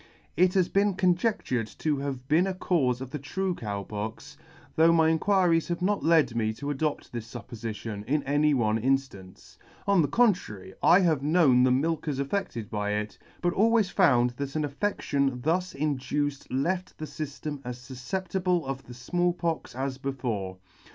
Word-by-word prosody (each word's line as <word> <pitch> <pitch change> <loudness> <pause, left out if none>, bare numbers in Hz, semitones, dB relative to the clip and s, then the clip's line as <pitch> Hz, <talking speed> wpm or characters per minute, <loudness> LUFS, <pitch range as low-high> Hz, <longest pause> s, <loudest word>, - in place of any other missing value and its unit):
It 180 +3 +3
has 185 -2 +3
been 200 -1 +2
conjectured 180 - +1
to 150 -2 0
have 135 -2 -5
been 165 +6 +3
a 190 - -2
caufe 135 -9 +1
of 130 -1 -7
the 150 - -4
true 185 +7 -2
Cow 100 -9 -4
Pox, 105 +2 -6 0.4
though 165 +1 +5
my 160 -1 +4
inquiries 170 0 +2
have 175 +1 -3
not 205 +2 +1
led 155 -7 +3
me 110 -1 0
to 145 +6 -4
adopt 150 +1 -2
this 115 -1 -7
fuppofition 110 -3 -6
in 145 +4 0
any 145 +1 +2
one 110 -3 +1
inftance; 130 -8 -3 0.3
on 200 -3 +4
the 150 - +2
contrary, 145 - +1
I 185 - +6
have 160 -6 +2
known 145 -4 +4
the 130 - +5
milkers 150 +1 0
affedted 140 - -2
by 105 -1 -1
it, 105 0 -4 0.2
but 175 0 +1
always 220 -1 +3
found 125 -10 +4
that 140 0 -4
an 155 -1 0
affedtion 140 -6 -1
thus 180 +4 0
induced 145 0 -2
left 180 +8 -1
the 155 - -5
fyftem 145 -1 -6
as 125 0 -5
fufcep 130 +9 -5
tible 180 -3 0
of 135 0 -5
the 120 - -10
Small 175 +8 0
Pox 165 -7 -3
as 130 0 -3
before. 120 -9 -3
145 Hz, 170 wpm, -27 LUFS, 125-175 Hz, 0.4 s, I